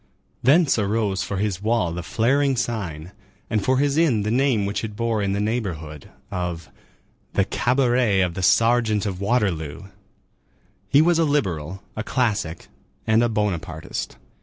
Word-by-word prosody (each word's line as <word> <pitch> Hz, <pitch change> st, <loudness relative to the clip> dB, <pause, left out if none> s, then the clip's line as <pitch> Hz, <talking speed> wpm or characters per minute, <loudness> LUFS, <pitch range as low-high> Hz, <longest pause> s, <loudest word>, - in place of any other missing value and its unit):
Thence 140 Hz, -1 st, +4 dB
arose 100 Hz, -2 st, 0 dB
for 100 Hz, -, -3 dB
his 100 Hz, -2 st, -1 dB
wall 110 Hz, -5 st, +1 dB
the 85 Hz, +2 st, -4 dB
flaring 130 Hz, +8 st, +1 dB
sign, 90 Hz, -9 st, -3 dB, 0.4 s
and 105 Hz, -2 st, +1 dB
for 130 Hz, +4 st, +2 dB
his 145 Hz, +1 st, +1 dB
inn 135 Hz, -11 st, +3 dB
the 105 Hz, -, -1 dB
name 125 Hz, -4 st, +2 dB
which 100 Hz, +2 st, -2 dB
it 105 Hz, -2 st, -5 dB
bore 115 Hz, -1 st, -1 dB
in 100 Hz, -1 st, 0 dB
the 100 Hz, -, -1 dB
neighborhood, 90 Hz, -, -3 dB, 0.2 s
of 85 Hz, -6 st, -4 dB, 0.6 s
"the 95 Hz, -, +2 dB
cabaret 120 Hz, -3 st, +2 dB
of 90 Hz, -2 st, 0 dB
the 95 Hz, -, -4 dB
Sergeant 115 Hz, +1 st, +3 dB
of 95 Hz, -2 st, -4 dB
Waterloo." 95 Hz, -, -1 dB, 1.1 s
He 145 Hz, +2 st, +5 dB
was 170 Hz, 0 st, +3 dB
a -, -, +4 dB
liberal, 95 Hz, -, -1 dB
a 110 Hz, -, -3 dB
classic, 110 Hz, -11 st, -1 dB, 0.4 s
and 110 Hz, +1 st, +3 dB
a 120 Hz, -, +2 dB
Bonapartist. 90 Hz, -7 st, -3 dB
105 Hz, 155 wpm, -23 LUFS, 95-120 Hz, 1.1 s, He